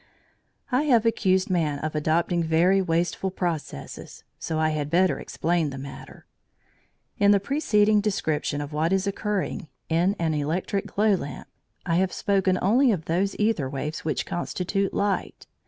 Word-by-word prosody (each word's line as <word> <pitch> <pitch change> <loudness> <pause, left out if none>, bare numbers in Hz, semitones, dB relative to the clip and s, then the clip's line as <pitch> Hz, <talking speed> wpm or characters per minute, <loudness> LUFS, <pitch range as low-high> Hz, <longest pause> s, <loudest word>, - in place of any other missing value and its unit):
I 260 +4 +2
have 235 -6 +4
accused 190 -4 +2
man 155 -5 +1
of 155 +2 -4
adopting 165 +3 +1
very 170 +4 +3
wasteful 175 +2 0
processes, 170 - -5 0.2
so 160 - -3
I 155 0 +2
had 150 -2 -2
better 180 +3 +2
explain 165 -2 -1
the 135 - -7
matter. 135 0 -10 0.9
In 200 - +5
the 205 -1 +6
preceding 210 -4 +2
description 155 -8 -1
of 145 +1 -6
what 160 +3 0
is 195 0 +1
occurring 200 -2 -2 0.2
in 175 +5 +2
an 165 -2 0
electric 165 +7 -1
glow 210 +1 +2
lamp, 145 -7 -4 0.4
I 170 -1 +1
have 185 0 +1
spoken 190 -2 +1
only 240 +7 +4
of 175 -7 -2
those 190 +4 0
æther 210 -11 0
waves 150 +3 -4
which 155 - -1
constitute 190 +3 -2
light. 200 -1 -2
180 Hz, 155 wpm, -25 LUFS, 155-200 Hz, 0.9 s, the